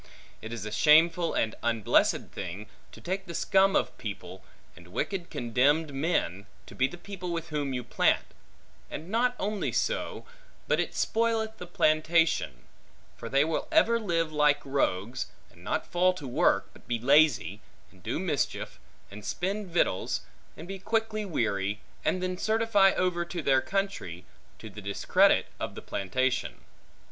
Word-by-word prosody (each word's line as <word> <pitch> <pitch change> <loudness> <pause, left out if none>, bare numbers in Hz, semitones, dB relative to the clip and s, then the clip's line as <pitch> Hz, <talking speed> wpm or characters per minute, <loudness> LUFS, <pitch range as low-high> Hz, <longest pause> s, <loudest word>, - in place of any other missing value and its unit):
It 110 - -7
is 115 -3 -5
a 105 - -5
shameful 165 +7 +4
and 110 - +1
unblessed 115 -3 +2
thing, 95 +3 -6 0.3
to - - -13
take 190 +2 -4
the 170 - -6
scum 195 +2 +3
of - - +1
people, - - -7 0.3
and - - -15
wicked 185 -4 -3
condemned 140 +6 +1
men, 120 - -1 0.2
to - - -13
be 130 - +2
the 175 - -10
people 180 -1 -6
with 170 0 -4
whom 145 -3 -2
you 125 -1 -3
plant; - - +2 0.6
and 165 - -7
not 245 +3 +1
only 205 +1 -2
so, - - -2 0.4
but - - +2
it - - -2
spoileth 225 -1 0
the 180 - -7
plantation; 155 - +2 0.5
for 115 - -8
they 140 +3 +3
will 160 0 -2
ever 235 -8 +4
live 165 -7 0
like 150 -1 +2
rogues, 130 -3 -1 0.2
and - - -18
not - - -1
fall 180 +1 +2
to 150 -7 -8
work, 120 - +2
but - - -19
be 120 - 0
lazy, 125 - +3 0.3
and - - -21
do - - -3
mischief, - - -2 0.3
and 105 +1 -10
spend 195 - -2
victuals, 170 - 0 0.4
and 165 - -9
be 195 0 -6
quickly 220 +1 -1
weary, 105 - -1 0.2
and 185 - 0
then 185 0 -2
certify 220 -3 +4
over 180 -2 0
to 170 -1 -5
their 135 -2 +4
country, 190 - -3 0.3
to - - -10
the 105 0 -10
discredit 100 0 +3
of - - -4
the - - -7
plantation. 130 +7 -1
160 Hz, 160 wpm, -28 LUFS, 120-190 Hz, 0.6 s, shameful